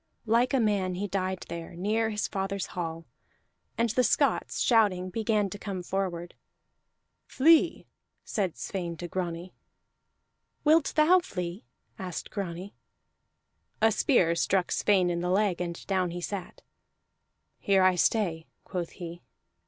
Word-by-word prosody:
Like 235 +3 +3
a 270 - +2
man 200 -5 +1
he 200 +3 -2
died 185 -1 -2
there, 170 0 -7
near 215 +5 0
his 210 -1 -1
father's 195 0 -2
hall; 165 -2 -4 0.7
and 230 -1 +2
the 250 +3 +2
Scots, - - +1
shouting, 195 -6 +3
began 215 0 +1
to 205 - -7
come 190 -4 -5
forward. 175 -2 -3 0.9
"Flee!" 320 +4 +4 0.4
said 190 -6 -2
Sweyn 175 -4 -4
to 175 - -5
Grani. 175 0 -4 1.1
"Wilt 310 0 +4
thou 320 +4 +6
flee?" 180 - -5 0.3
asked 185 -2 -5
Grani. 190 0 -5 1.1
A 220 +1 +4
spear 190 - +3
struck 185 +2 +1
Sweyn 185 -4 +3
in 170 - -1
the 180 - -1
leg, 190 -1 +1
and 170 -1 -5
down 185 -2 0
he 175 +1 -5
sat. 195 +1 -6 1.0
"Here 195 -1 +3
I 185 0 +5
stay," 175 -3 +1 0.2
quoth 175 -2 -4
he. 175 -1 -8
190 Hz, 135 wpm, -28 LUFS, 175-215 Hz, 1.1 s, thou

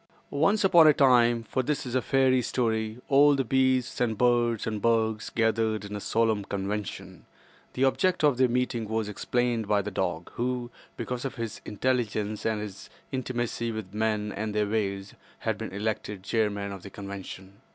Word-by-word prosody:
Once 195 +9 +2
upon 175 -4 +7
a 155 - +7
time—for 120 -2 +3
this 145 +2 -2
is 125 - -5
a 130 - +2
fairy 130 +2 +3
story—all 120 +5 +2
the 135 - +1
beasts 130 0 +1
and 110 -3 +1
birds 120 -2 +2
and 110 -2 -3
bugs 110 -1 +1
gathered 110 -2 0
in 100 +1 -6
a - - -3
solemn 110 0 +1
convention. 95 -2 -5 0.5
The 130 - 0
object 175 +6 +2
of 145 -4 +4
their 130 -1 +4
meeting 120 -3 -1
was 110 -1 -1
explained 115 +2 -1
by 100 -1 +2
the 105 - -5
dog, 90 -3 -2
who—because 125 0 -4
of 135 - -4
his 115 -3 -5
intelligence 110 -2 -1
and 110 -1 0
his 100 -2 -8 0.2
intimacy 120 -3 -2
with 110 -4 -6
men 105 -1 0
and 105 0 -4
their 105 0 +2
ways—had 100 +1 -3
been 110 - -5
elected 105 -1 -3
chairman 100 -2 -1
of 100 -2 -7
the 100 - -9
convention. 100 0 -9
110 Hz, 160 wpm, -27 LUFS, 105-125 Hz, 0.5 s, upon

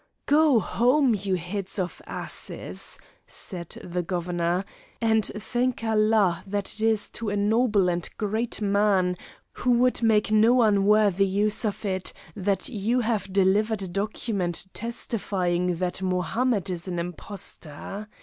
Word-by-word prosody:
"Go 295 -4 +5
home, 250 +5 +3
you 195 -1 -1
heads 185 +3 -4
of 180 -2 -3
asses," - - -4 0.3
said 175 -3 -6
the 180 0 -2
Governor, 175 +1 -1 0.3
"and 220 -1 +3
thank 240 +4 -2
Allah 215 -5 +2
that 200 0 -2
it 215 - -4
is 220 -1 +2
to 230 -2 -4
a 205 - -1
noble 210 -1 +3
and 175 -1 0
a - - -31
great 220 +1 -1
man 200 -3 +2 0.4
who 250 - -3
would 250 +1 +2
make 215 -2 +3
no 230 +3 +5
unworthy 200 -2 +4
use 205 +4 0
of 210 0 -3
it 185 -2 -1 0.2
that 195 -1 0
you 235 +2 0
have 215 -4 -1
delivered 200 +2 +2
a - - -4
document 195 -2 -1
testifying 185 -6 -1
that 180 +2 -2
Mohammed 190 +3 0
is 175 0 -4
an 180 -1 -3
impostor. 180 +2 -5
205 Hz, 140 wpm, -26 LUFS, 185-220 Hz, 0.4 s, Go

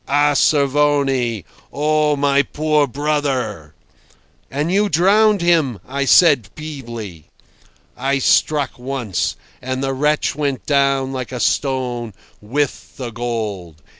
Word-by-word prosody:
"A 145 +1 +2
Cervoni! 140 - +2 0.3
Oh! 150 +1 +1
my 140 0 +2
poor 150 +1 0
brother!.. 135 - -2 0.4
." - - -35 0.3
"And 150 +5 -2
you 205 +2 +2
drowned 200 +3 +3
him," 155 - +2
I 140 +1 -2
said 140 - +5
feebly. 115 - -8 0.7
"I 135 +2 0
struck 140 0 +1
once, 125 -6 -2 0.3
and 130 +1 -3
the 135 0 -1
wretch 150 +3 0
went 140 -2 -3
down 135 -2 +1
like 130 -2 -5
a 125 - -5
stone—with 125 0 -3
the 125 -3 -5
gold. 105 -9 -5
135 Hz, 115 wpm, -19 LUFS, 120-150 Hz, 0.7 s, said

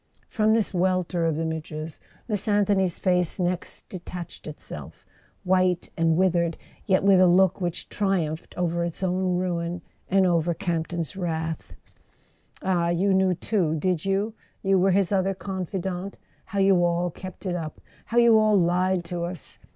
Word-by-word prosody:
From 220 -1 +2
this 220 -3 0
welter 180 -1 +1
of 160 -2 0
images 160 -1 -4 0.3
Miss 210 -3 0
Anthony's 200 -3 +2
face 180 -2 +1
next 180 0 -2
detached 180 -3 -8
itself: 150 - -9 0.4
white 185 -1 +1
and 165 -1 +2
withered, 175 -3 +2 0.3
yet 190 -1 +3
with 195 -2 +6
a 185 - +6
look 185 +1 +4
which 175 -2 -3
triumphed 175 -6 -2
over 170 -1 0
its 170 +2 -4
own 185 0 +1
ruin, 175 -1 -2 0.3
and 190 0 +4
over 170 -1 +2
Camp 170 -4 -2
ton's 170 -2 -4
wrath. 160 -3 -3 0.9
"Ah—you 180 +1 +2
knew 190 -1 +3
too, 175 -4 0
did 175 0 0
you? 195 +3 0 0.3
You 195 -1 +3
were 190 +2 +3
his 195 0 +2
other 195 0 +1
confidant? 190 0 -4 0.3
How 200 - -6
you 195 -2 +4
all 175 0 +1
kept 185 +4 -10
it 185 - -1
up—how 165 +7 -7
you 235 -2 +7
all 215 -1 +4
lied 180 +1 +1
to 170 0 -4
us!" 175 -4 -5
180 Hz, 150 wpm, -25 LUFS, 170-190 Hz, 0.9 s, you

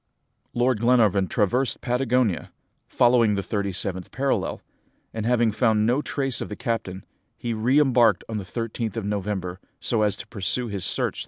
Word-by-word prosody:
Lord 120 -1 +2
Glenarvan 110 -5 +3
traversed 120 +6 0
Patagonia, 125 -5 0 0.4
following 120 -3 +3
the 100 - -2
thirty 100 -1 -2
seventh 95 -1 -1
parallel, 135 +1 -1 0.5
and 110 0 -3
having 120 -2 +3
found 110 -1 +2
no 125 +5 +2
trace 135 -4 -2
of - - -4
the 105 - -5
captain, 100 -5 -3 0.3
he 120 -1 -3
re 120 +6 +2
embarked 120 -9 +4
on 110 -2 -3
the - - -5
13th 115 +2 -4
of 110 - -3
November, 100 -3 -3 0.2
so 115 -3 0
as 105 -1 +2
to - - -8
pursue 110 +4 -1
his 100 -3 -4
search - - 0
through - - +2
the - - 0
Ocean. - - -10
115 Hz, 180 wpm, -24 LUFS, 100-125 Hz, 0.5 s, embarked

